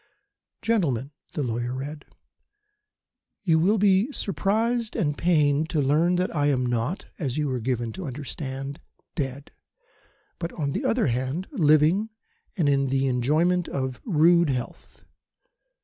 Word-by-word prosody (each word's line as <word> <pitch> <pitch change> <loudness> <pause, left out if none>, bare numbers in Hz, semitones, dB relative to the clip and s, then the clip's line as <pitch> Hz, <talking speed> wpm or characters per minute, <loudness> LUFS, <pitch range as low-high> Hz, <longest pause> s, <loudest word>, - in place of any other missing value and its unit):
"Gentlemen" 145 - 0 0.2
the 150 - -1
lawyer 120 +1 -2
read 145 +3 -6 1.4
"You 165 -5 +3
will 200 +7 +3
be 200 +5 +3
surprised 220 - -1
and 150 -10 0
pained 155 -2 +2
to 160 - 0
learn 155 +6 +3
that 180 -1 -1
I 145 -1 +2
am 130 -3 +1
not 120 - -1
as 135 -6 -2
you 150 -1 0
were 130 -2 -1
given 120 -1 -2
to 185 -4 -6
understand 135 0 -6 0.3
dead; 135 -1 -4 0.9
but 170 -1 -3
on 145 -4 -2
the 265 - -3
other 240 -1 +2
hand, 130 +7 -1
living 165 - +3 0.5
and 165 -6 +2
in 140 -1 +2
the 135 +1 +1
enjoyment 155 +8 +2
of 130 -2 -3
rude 170 -3 +4
health. 125 -3 -5
150 Hz, 135 wpm, -25 LUFS, 135-180 Hz, 1.4 s, rude